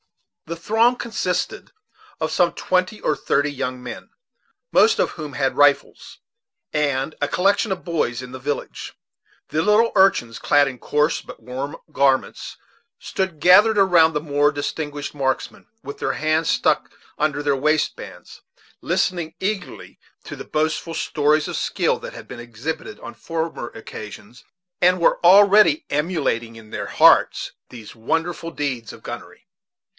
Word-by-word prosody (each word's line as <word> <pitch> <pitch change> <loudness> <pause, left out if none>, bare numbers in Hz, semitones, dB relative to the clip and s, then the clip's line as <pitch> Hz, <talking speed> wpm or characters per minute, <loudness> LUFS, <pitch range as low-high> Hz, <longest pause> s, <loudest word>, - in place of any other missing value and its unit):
The 170 - -4
throng 225 +7 +2
consisted 235 -2 -3 0.5
of - - -2
some - - +2
twenty 185 +3 -1
or 155 - +1
thirty 145 0 0
young 130 -2 -4
men, 125 - -8 0.6
most 445 - +5
of - - +1
whom 150 -4 -8
had 135 -2 -1
rifles, 145 -1 +1 0.6
and 145 -1 0
a 145 - +1
collection 195 +6 +1
of 190 - 0
all - - -22
the 170 - -6
boys 125 -7 -1
in 125 - -10
the 130 - -7
village. 145 +3 -5 0.6
The 155 - 0
little 210 +4 +3
urchins, 155 - +3
clad 145 -1 +3
in 130 -2 -6
coarse 150 +4 0
but - - -12
warm 130 +6 -6 0.2
garments, 135 -1 0 0.4
stood 190 -5 -3
gathered 205 +7 +6
around 175 -5 +5
the 150 - 0
more 145 -1 +2
distinguished 145 0 -4
marksmen, 135 -2 -3 0.2
with 140 - -8
their - - -1
hands 155 +1 0
stuck - - +1 0.3
under 150 -1 0
their 145 -1 +2
waistbands, 150 +2 -2 0.4
listening 170 -3 -1
eagerly 200 +1 -5 0.3
to - - -7
the - - -8
boastful 155 +1 -2
stories 150 0 +1
of - - -4
skill - - 0
that - - -8
had - - -11
been 125 - -9
exhibited 120 0 -6
on 120 - -9
former 160 +4 -4
occasions, 110 +1 -11 0.4
and 180 +1 +4
were 170 - +3
already 195 -3 +6
emulating 145 -7 -1
in 110 -1 -14
their - - -4
hearts - - +4 0.2
these 110 -4 -11
wonderful 165 +8 -2
deeds 130 -8 -4
in - - -12
gunnery. - - -10
150 Hz, 150 wpm, -21 LUFS, 135-175 Hz, 0.6 s, gathered